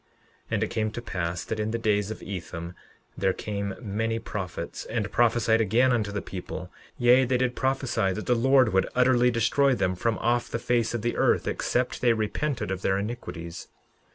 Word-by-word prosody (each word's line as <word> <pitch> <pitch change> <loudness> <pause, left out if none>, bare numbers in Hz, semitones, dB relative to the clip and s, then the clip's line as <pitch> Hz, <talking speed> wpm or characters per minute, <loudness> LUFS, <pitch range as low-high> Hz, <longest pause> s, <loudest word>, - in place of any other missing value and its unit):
11:12 - - -40 0.4
And 110 -1 0
it 110 - -2
came 110 -2 0
to 110 - -6
pass 90 -4 -3
that 110 - -4
in 105 0 -1
the 115 - -1
days 105 -2 +1
of 110 - -6
Ethem 90 -3 -6 0.4
there 95 - +1
came 100 -1 -4
many 115 0 -2
prophets, 95 -5 -5
and 110 -3 -2
prophesied 115 -1 +3
again 120 +5 +3
unto 105 -4 0
the 100 - -3
people; 90 -2 -7 0.3
yea, 125 +2 +5
they 130 0 +1
did 125 0 0
prophesy 130 -7 0
that 105 +3 -4
the 125 - +3
Lord 130 -1 +4
would 95 0 +2
utterly 125 -1 +4
destroy 130 +3 +2
them 95 -4 0
from 110 +5 -1
off 120 0 0
the - - -2
face 120 -1 0
of 115 - -3
the 120 - 0
earth - - +2
except 125 +1 -1
they 120 -2 +4
repented 115 - -2
of 95 -1 -3
their 95 0 +1
iniquities. 90 -6 -6
110 Hz, 195 wpm, -26 LUFS, 100-120 Hz, 0.4 s, yea